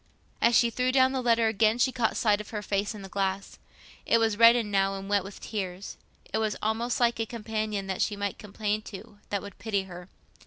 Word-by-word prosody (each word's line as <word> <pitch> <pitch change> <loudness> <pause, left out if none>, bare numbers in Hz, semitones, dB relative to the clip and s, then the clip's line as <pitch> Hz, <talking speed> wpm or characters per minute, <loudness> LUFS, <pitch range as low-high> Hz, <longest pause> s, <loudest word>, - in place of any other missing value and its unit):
As 235 0 +4
she 235 -1 +4
threw 250 +2 0
down 260 0 +4
the 265 -1 -1
letter 230 -2 +3
again, 220 +1 +2
she 255 +1 +2
caught 240 -3 0
sight 210 -2 +2
of 210 - -12
her 210 -2 -5
face 205 +2 -1
in 205 - -9
the - - -7
glass; 195 0 -3 0.4
it 230 - +3
was 225 -2 +1
reddened 230 -1 +5
now, 195 0 +2
and 195 0 -7
wet 200 -1 +1
with 195 +1 -10
tears; 190 -3 -5 0.4
it - - +1
was 215 -1 0
almost 225 +3 -1
like 235 -1 +2
a 225 - 0
companion 215 -3 -3
that 190 -1 -3
she 210 - 0
might 200 0 -4
complain 210 +1 -2
to—that 205 -1 -7
would 200 -1 -11
pity 200 -4 -1
her. 180 -1 -11
210 Hz, 220 wpm, -27 LUFS, 200-230 Hz, 0.4 s, reddened